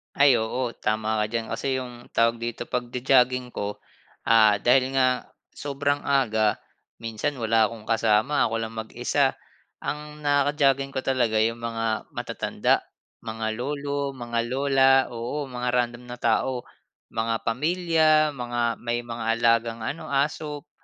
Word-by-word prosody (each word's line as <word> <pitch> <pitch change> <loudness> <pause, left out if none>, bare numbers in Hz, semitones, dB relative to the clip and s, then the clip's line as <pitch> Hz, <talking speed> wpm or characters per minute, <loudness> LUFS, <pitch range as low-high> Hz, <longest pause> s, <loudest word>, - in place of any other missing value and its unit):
Ay, 140 -2 +6
oo 120 +2 -1
tama 110 0 0
ka - - +2
diyan 115 -1 -2
kasi 135 -1 -1
yung 120 -2 -9
tawag 115 0 +2
dito 120 0 -4
pag-jo-jogging 125 0 +1
ko, 105 0 -4 0.5
ah, 110 -3 +5
dahil 130 +1 +3
nga 130 -2 +2 0.2
sobrang 145 0 -2
aga 110 -6 +2 0.4
minsan 115 +6 -2
wala 110 0 +4
akong 110 0 -8
kasama 115 +5 +3
ako 115 - -2
lang 110 0 -6
mag-isa. 120 +5 0 0.5
Ang 150 0 -5
naka-jogging 140 -1 +2
ko 130 - -1
talaga 120 -5 +1
yung 115 +1 +1
mga 115 -1 -2
matatanda - - 0 0.4
mga 110 -1 -4
lolo, 140 +1 -2
mga 120 -2 -3
lola, 135 0 +3 0.2
oo 120 +5 -4
mga 125 0 -3
random 120 0 -1
na 125 - -6
tao, 125 +2 +1 0.4
mga 115 0 -1
pamilya 155 +3 +2
mga 120 -4 -2
may 120 0 -2
mga 120 -1 -6
alagang 115 -1 +2
ano, 140 +8 -4
aso, 145 +1 -2
120 Hz, 135 wpm, -25 LUFS, 115-140 Hz, 0.5 s, Ay